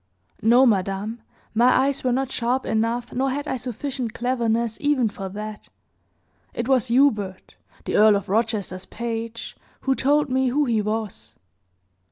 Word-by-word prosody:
"No, 240 +4 +5
madame, 205 +1 0 0.3
my 240 +3 +5
eyes 280 0 -1
were 255 - +1
not 265 +1 -1
sharp 250 +2 -1
enough, 230 +2 -1
nor 265 +2 0
had 285 +3 -3
I 260 - -1
sufficient 250 -1 -5
cleverness, 235 -2 0
even, 285 -6 +2
for 195 -1 -7
that. 210 +2 -7 0.9
It 235 - -2
was 260 -3 +3
Hubert, 220 -7 +1 0.3
the - - 0
Earl 215 0 +6
of 200 - -2
Rochester's 205 -3 -1
page, 230 0 -5 0.3
who 270 - +1
told 290 +3 +2
me 260 0 +1
who 285 +4 +2
he 230 -4 +1
was." 210 - -4
235 Hz, 150 wpm, -23 LUFS, 215-260 Hz, 0.9 s, Earl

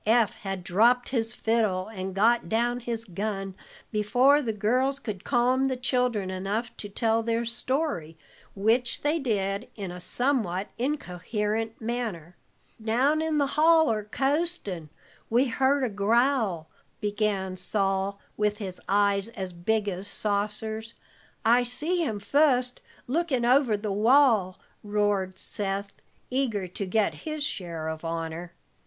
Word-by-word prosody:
Eph 225 -1 +4
had 195 -2 -5
dropped 235 +8 +3
his 230 -3 -1
fiddle, 220 -6 0
and 190 -3 -6
got 230 +4 +3
down 240 +2 +1
his 230 -1 -4
gun 195 0 -4 0.4
before 245 +7 +4
the 235 -5 -1
girls 250 +6 +1
could 215 -9 -6
calm 255 +1 +2
the 260 -1 -1
children 245 -6 0
enough 200 +6 -3
to 205 - -6
tell 225 +2 +1
their 230 +1 -1
story, 235 - -2 0.4
which 230 +5 +1
they 300 +3 +1
did 200 -7 -1
in 195 -4 -5
a 180 - -8
somewhat 205 -2 0
incoherent 220 - -2
manner. 220 -8 -4 0.5
"Down 260 +8 +2
in 320 -1 0
the 285 - +3
holler, 305 -6 +4
coastin', 270 - 0 0.4
we 240 +4 +4
heard 270 +3 +2
a - - +2
growl," 215 - +1 0.3
began 205 -2 -1
Sol, 195 +1 0 0.2
with 210 0 0
his 190 -4 -6
eyes 200 0 +2
as 190 -5 -6
big 210 +5 0
as 190 0 -3
saucers. 215 +2 -2 0.5
"I 240 +2 +5
see 305 +9 0
him 220 -8 -2
fust 250 +1 +2 0.2
lookin' 270 -3 0
over 250 -3 +4
the 210 0 -3
wall," 220 -3 +4 0.2
roared 205 -3 0
Seth, 200 -1 0 0.4
eager 245 -7 0
to 185 +2 -5
get 210 +2 +1
his 310 -2 -4
share 170 - -4
of 160 0 -5
honor. 165 +1 -4
220 Hz, 135 wpm, -27 LUFS, 195-250 Hz, 0.5 s, I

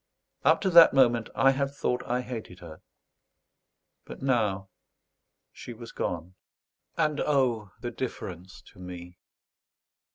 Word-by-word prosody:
Up - - +4
to 190 - 0
that 170 -4 +8
moment 120 -4 +3
I 135 - +5
had 135 +1 -1
thought 135 -3 -2
I 125 +1 0
hated 115 -7 -7
her; 85 -3 -12 1.2
but - - -10
now 105 -7 0 0.8
she 120 - -10
was 115 0 -11
gone, 90 +1 -4 0.6
"And 155 -2 +1
O! 125 -8 +1
The 120 -1 -4
difference 95 -7 -7
to - - -18
me!" 90 -1 -10
120 Hz, 125 wpm, -27 LUFS, 95-135 Hz, 1.2 s, that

